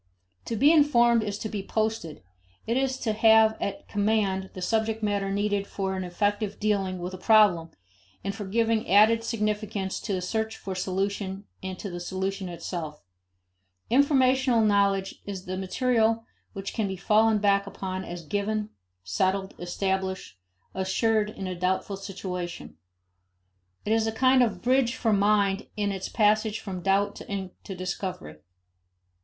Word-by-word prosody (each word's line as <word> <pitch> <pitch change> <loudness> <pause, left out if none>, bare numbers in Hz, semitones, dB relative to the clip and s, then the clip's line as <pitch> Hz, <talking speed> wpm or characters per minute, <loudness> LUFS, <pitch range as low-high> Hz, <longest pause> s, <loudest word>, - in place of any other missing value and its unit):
To 230 - -3
be 280 +8 +5
informed 240 -7 +5
is 205 -2 -3
to 220 - -4
be 210 -2 -4
posted; 215 - -2 0.4
it 230 - 0
is 265 0 0
to 220 - 0
have 220 0 +5
at 200 - -4
command 200 -2 0
the - - -6
subject 220 +2 0
matter 200 -2 0
needed 205 0 0
for 190 -1 -3
an 185 - -3
effective 205 +3 -1
dealing 195 -3 0
with 180 +1 -5
a 185 - -7
problem, 200 -7 +4 0.5
and 195 +1 -2
for 205 0 -6
giving 225 +2 +1
added 220 +4 +5
significance 210 -3 -2
to 205 - -3
the 185 - -1
search 220 +3 -2
for 195 - -5
solution 195 +1 -2 0.2
and 190 -1 -5
to 200 - -6
the 175 - -5
solution 190 +1 -3
itself. 170 -3 -6 0.9
Informational 260 -2 +4
knowledge 200 -2 +1
is 190 -2 -6
the 185 - -4
material 225 +3 +1 0.3
which 195 -2 -5
can 220 -3 -1
be 190 -1 -4
fallen 215 +4 +3
back 200 -1 +2
upon 190 -1 -5
as 175 -2 -7
given, 210 +3 -2 0.3
settled, 190 - 0
established, 190 - -2 0.4
assured 210 +3 +1
in 205 -3 -7
a 185 - -3
doubtful 185 +2 -1
situation. 185 -3 -6 1.1
It 215 - +1
is 225 0 +2
a - - 0
kind 255 +3 +4
of 210 -7 0
bridge 255 0 +2
for 225 -4 +1
mind 200 0 +2
in 205 -1 0
its 190 -1 -4
passage 215 0 +2
from 185 -3 -6
doubt 200 +2 +1
to 195 -1 -6
discovery. 180 - -5
200 Hz, 150 wpm, -27 LUFS, 190-220 Hz, 1.1 s, be